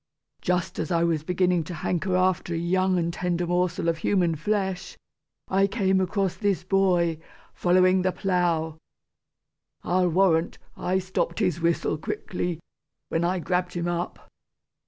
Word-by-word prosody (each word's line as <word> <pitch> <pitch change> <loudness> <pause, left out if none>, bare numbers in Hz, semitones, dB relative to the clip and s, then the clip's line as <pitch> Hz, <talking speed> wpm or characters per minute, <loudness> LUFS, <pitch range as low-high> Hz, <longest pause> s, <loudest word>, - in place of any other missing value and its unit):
Just 180 0 -1
as - - -2
I 170 -1 +2
was 165 -3 +1
beginning 180 0 +1
to 175 - -6
hanker 180 +3 -1
after 185 -2 +1
a - - -1
young 185 +2 +1
and 170 -1 -1
tender 175 0 -1
morsel 175 -1 0
of 165 -1 0
human 175 -2 +2
flesh, 190 +3 -2 0.5
I 195 +1 +3
came 190 -3 +1
across 190 0 0
this 200 -4 0
boy, 180 -4 +2 0.3
following 185 +1 +3
the 185 0 +1
plough. 170 -4 0 1.0
I'll 180 0 +2
warrant, 175 -2 +2 0.2
I 185 +1 0
stopped 190 0 -2
his 180 -6 0
whistle 170 -2 0
quickly, 175 +1 -3 0.5
when 165 - 0
I 180 +2 +1
grabbed 180 +1 -1
him 175 0 -1
up! 175 0 -4
180 Hz, 145 wpm, -25 LUFS, 170-185 Hz, 1.0 s, I